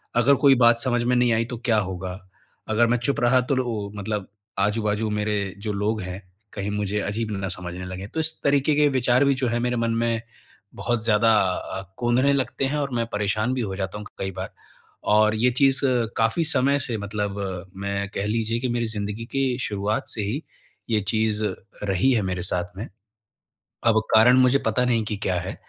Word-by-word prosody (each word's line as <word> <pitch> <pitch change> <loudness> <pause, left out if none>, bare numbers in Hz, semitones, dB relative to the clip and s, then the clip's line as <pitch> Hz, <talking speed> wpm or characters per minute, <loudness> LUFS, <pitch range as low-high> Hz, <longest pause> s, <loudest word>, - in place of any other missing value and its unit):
अगर 125 +4 +5
कोई 135 -1 +8
बात 120 0 +6
समझ 120 -1 +1
में 125 +1 +2
नहीं 120 -1 +3
आई 115 +1 +1
तो 120 0 -6
क्या 115 -3 +3
होगा? 95 -1 -5 0.5
अगर 115 +2 +3
मैं 120 +1 +2
चुप 125 +4 -1
रहा 120 +2 +4
तो 130 +2 -1
लो 115 -6 -2
मतलब 100 -1 -3 0.3
आजू-बाजू 105 +1 0
मेरे 105 -2 -1
जो 105 0 -3
लोग 105 +2 -1
हैं, 90 +1 -6 0.3
कहीं 100 0 -3
मुझे 105 0 -1
अजीब 110 +2 -2
ना 95 -1 -3
समझने 90 0 -5
लगे। 95 +2 -6
तो 160 - -5
इस 160 0 0
तरीके 140 +1 +3
के 150 0 +4
विचार 130 0 +3
भी 140 - +4
जो 130 -1 -1
है 120 0 0
मेरे 125 0 0
मन 115 0 0
में, 115 -1 0 0.5
बहुत 120 -2 -1
ज़्यादा 115 0 +4
अ, 95 +1 -3 0.2
कोंदने 125 +4 +2
लगते 135 0 -1
हैं 145 +3 -1
और 140 -2 -2
मैं 115 -1 0
परेशान 105 +4 0
भी 130 - -1
हो 100 -4 -3
जाता 95 +1 -4
हूँ 105 - -8
क - - -24
कई 95 - -2
बार। - - -6 0.6
और 110 0 +4
ये 120 +3 +2
चीज़ 135 -1 +4 0.4
काफ़ी 115 +9 +2
समय 140 -2 +3
से 120 -4 -2
मतलब 100 -1 -3 0.4
मैं 100 0 -2
कह 100 - -1
लीजिए 115 +1 0
कि 130 - -1
मेरी 120 0 0
ज़िंदगी 105 +1 -4
के 135 -2 +1
शुरुआत 105 -2 -2
से 110 - 0
ही, 110 +10 -3 0.5
ये 110 -2 +2
चीज़ 110 -1 +1 0.4
रही 100 +5 +2
है 115 - +2
मेरे 90 -1 -2
साथ 90 0 -3
में। 110 - -5 1.0
अब 110 -1 +5
कारण 120 +3 +7
मुझे 130 +1 +5
पता 125 - +2
नहीं 115 -3 +1
कि 105 0 -3
क्या 95 - +1
है? 95 +3 -5
110 Hz, 205 wpm, -24 LUFS, 100-125 Hz, 1.0 s, कोई